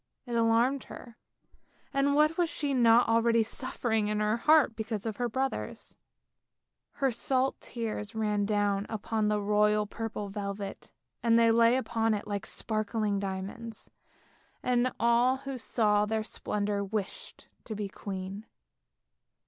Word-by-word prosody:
It 240 - -6
alarmed 230 +4 +2
her, 235 -2 -11 0.8
and 275 +1 +2
what 305 +2 +4
was 345 -1 +1
she 290 -4 -2
not 235 -1 +5
already 230 0 +3
suffering 225 -2 -1
in 210 0 -1
her 210 +1 +1
heart 295 -2 +4
because 220 -1 -4
of 220 -2 -3
her 245 -1 -1
brothers? 265 +3 -3 1.0
Her 270 -2 +1
salt 260 +3 0
tears 220 -3 -5
ran 210 -2 0
down 205 -1 0
upon 220 0 -1
the 210 0 +1
royal 210 +1 +2
purple 215 -1 -5
velvet, 200 0 -6 0.3
they 230 0 +4
lay 230 +1 +5
upon 225 -4 0
it 205 - -5
like 205 -1 -4
sparkling 215 -2 0
diamonds, 200 +4 -6 0.7
and 250 0 +2
all 235 +3 +3
who 275 0 -6
saw 210 -4 +1
their 220 0 -1
splendour 205 -1 -2
wished 200 0 -5 0.2
to 220 - -5
be 205 -1 -3
queen. 195 +2 -7
225 Hz, 135 wpm, -29 LUFS, 210-240 Hz, 1.0 s, not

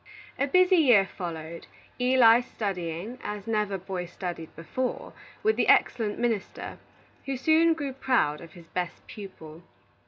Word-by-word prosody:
A 280 - +2
busy 365 +4 +5
year 245 - +6
followed, 170 -3 -7 0.3
Eli 250 -2 +6
studying, 195 0 -4
as 210 -1 -5
never 210 -3 0
boy 185 -1 -5
studied 175 -2 -6
before, 250 +10 -4 0.3
with 435 +1 +2
the - - +2
excellent 220 -4 +3
minister, 230 -4 -3 0.5
who 270 -1 -2
soon 320 +4 +4
grew 285 -4 -4
proud 250 - +1
of 165 -2 -12
his 170 -1 -14
best 180 0 -5
pupil. 165 -6 -10
210 Hz, 135 wpm, -27 LUFS, 175-255 Hz, 0.5 s, year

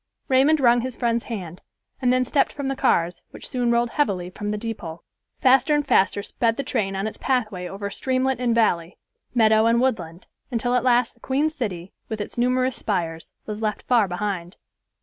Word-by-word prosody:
Raymond 275 +4 +4
rung 240 -2 +4
his 255 0 -5
friend's 235 -1 0
hand, 180 -7 -6 0.4
and 250 -1 +3
then 255 0 +2
stepped 275 +3 +2
from 285 - -6
the 270 - -1
cars, 175 -9 +1
which - - -9
soon 245 -2 -1
rolled 235 0 +2
heavily 185 -11 -1
from 205 +2 -5
the 210 - -1
depot. 200 -7 -6 0.4
Faster 265 +3 +4
and 295 -1 0
faster 200 -4 +3
sped 230 +1 0
the 275 - -2
train 205 -7 -1
on 195 +1 -2
its 220 - -5
pathway 215 -9 -1
over 200 +2 -5
streamlet 260 +2 0
and 240 -2 +1
valley, 175 -6 +1 0.4
meadow 220 -1 +5
and 230 +1 +3
woodland, 180 -10 -2 0.2
until 245 -1 -1
at 250 -1 +2
last 245 -1 +3
the 235 - -29
Queen 280 +5 0
City, 195 - -5 0.2
with 220 - -4
its 205 - -5
numerous 255 +1 +1
spires, 165 -5 -3
was 210 0 -5
left 215 -2 -2
far 235 -5 +3
behind. 180 -1 -4
230 Hz, 190 wpm, -23 LUFS, 195-255 Hz, 0.4 s, meadow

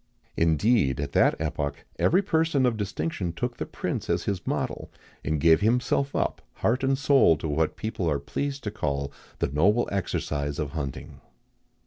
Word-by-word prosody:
[XIX 80 - +2
44] - - +4
Indeed, 80 - +2
at 70 -1 -3
that - - +4
epoch, 75 -2 -3
every 185 +4 +3
person 160 -7 +2
of 120 -2 +2
distinction 100 - -3
took 120 +7 -3
the - - -4
prince - - -4
as - - +1
his 95 -3 -3
model, - - -2 0.3
and 80 -1 -1
gave 80 +3 +5
himself 125 +5 +1
up, - - -1
heart 125 +4 0
and 135 0 +2
soul, 135 - +5
to 80 - -4
what 80 +1 0
people 110 -6 -2
are 75 - +1
pleased 140 - -4
to 105 - -3
call 70 -7 -2 0.3
"the - - 0
noble 100 - +3
exercise 75 -6 -2
of 75 -3 -3
hunting." 70 -5 -6
95 Hz, 175 wpm, -26 LUFS, 75-125 Hz, 0.3 s, gave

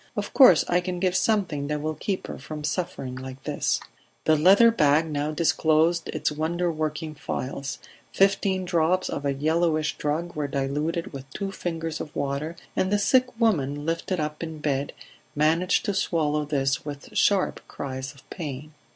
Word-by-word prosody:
"Of - - -3
course 250 - +7
I 175 - +3
can 180 0 -4
give 185 0 +1
something 185 -10 +1
that 150 0 -1
will 155 +1 -2
keep 185 +5 -3
her - - -7
from 150 +3 -7
suffering 150 -5 -3
like 130 0 -8
this." - - 0 0.5
The 155 - +5
leather 195 +9 +6
bag 150 -5 +3
now 150 -1 -2
disclosed 160 +1 +2
its - - -1
wonderworking 155 -1 -2
phials; 135 -1 -4 0.3
fifteen 195 -1 +2
drops 175 +1 +1
of 145 - -4
a 140 - +1
yellowish 155 +1 +1
drug 160 +4 -2
were 150 -1 -1
diluted 145 +5 -2
with 135 0 -8
two 195 -1 -3
fingers 165 -4 -4
of 150 - -8
water, 145 +4 -2 0.2
and 190 - +1
the 205 - +4
sick 250 +3 +2
woman, 145 - +1
lifted 165 +2 -1
up 150 0 -3
in 160 -1 -5
bed, 145 -2 -1 0.4
managed 165 +5 +2
to 205 - 0
swallow 155 -5 0
this 135 -2 0
with 145 -1 -8
sharp 200 -2 +2
cries 130 -1 -5
of 135 - -19
pain. 150 -3 -6
155 Hz, 165 wpm, -25 LUFS, 145-175 Hz, 0.5 s, course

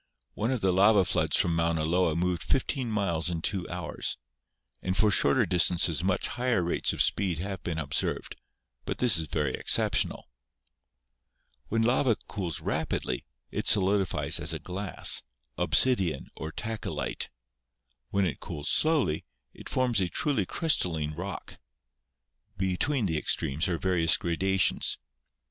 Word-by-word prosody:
One 110 - -2
of 130 -4 -1
the 95 - +2
lava 100 +1 +5
floods - - +2
from 85 -1 +2
Mauna 85 -1 0
Loa 85 -1 +1
moved 90 0 0
fifteen 130 -2 -1
miles 90 -6 -1
in 85 -2 -3
two 95 -3 -2
hours, 90 -1 -3 0.6
and 90 0 -2
for 105 +2 +4
shorter 70 -7 +3
dis 90 -2 +3
tances 85 -3 +2
much 95 0 0
higher 120 -6 0
rates 85 - +1
of - - +2
speed 95 -5 0
have 95 +1 -5
been 85 -1 -4
observed; 75 -3 -2 0.5
but - - -3
this 115 -9 +4
is 80 - -3
very 75 -4 -1
exceptional. - - +1 1.4
When 115 +1 0
lava 120 0 +2
cools 90 -6 -4
rapidly, - - -2 0.3
it - - -3
solidifies 95 -2 +4
as - - -1
a - - -2
glass 95 +1 -1 0.2
— - - -50
obsidian 95 - +3
or 80 - -6
tachylite. 110 +5 -4 0.8
When 100 -1 +1
it 85 - -3
cools 75 -1 -4
slowly, 145 - +2 0.3
it - - -11
forms 125 -5 +1
a 90 - 0
truly 125 - 0
crystal 150 - +1
line 75 -1 -3
rock. 90 +4 -7 1.0
Between 100 +7 0
the 80 -4 0
extremes 75 +5 -1
are 85 -3 -1
various 85 -3 +2
gradations. 95 +2 +1
90 Hz, 145 wpm, -28 LUFS, 85-105 Hz, 1.4 s, lava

